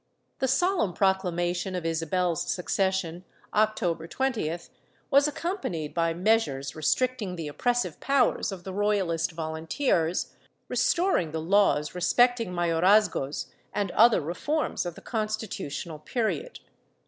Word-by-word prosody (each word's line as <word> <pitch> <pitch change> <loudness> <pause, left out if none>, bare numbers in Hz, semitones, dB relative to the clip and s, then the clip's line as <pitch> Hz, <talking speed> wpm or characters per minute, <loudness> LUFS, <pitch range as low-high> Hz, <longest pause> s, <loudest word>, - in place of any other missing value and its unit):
The 265 - +1
solemn 330 - +2
proclamation 180 -1 0
of 175 -2 -4
Isabel's 165 +1 0
succession, 185 -2 -1 0.3
October 205 -6 +1
20th, 195 -10 -2 0.4
was 280 +1 +6
accompanied 295 - -3
by 165 -1 +1
measures 165 -8 +1
restrictmg 205 - 0
the 165 -2 -4
oppressive 240 - -1
powers 275 -5 +2
of 185 -2 -7
the 190 - -6
Royalist 195 -5 +1
Volunteers, 160 - -1 0.3
restoring 340 - +1
the 160 - -1
laws 165 -3 +2
respecting 235 +4 +2
mayorazgos 175 -3 +2 0.3
and 200 -3 -1
other 230 +2 +5
reforms 180 - -2
of 175 - -6
the - - -12
Constitutional 215 - -4
period. 240 - -3
185 Hz, 110 wpm, -27 LUFS, 165-225 Hz, 0.4 s, was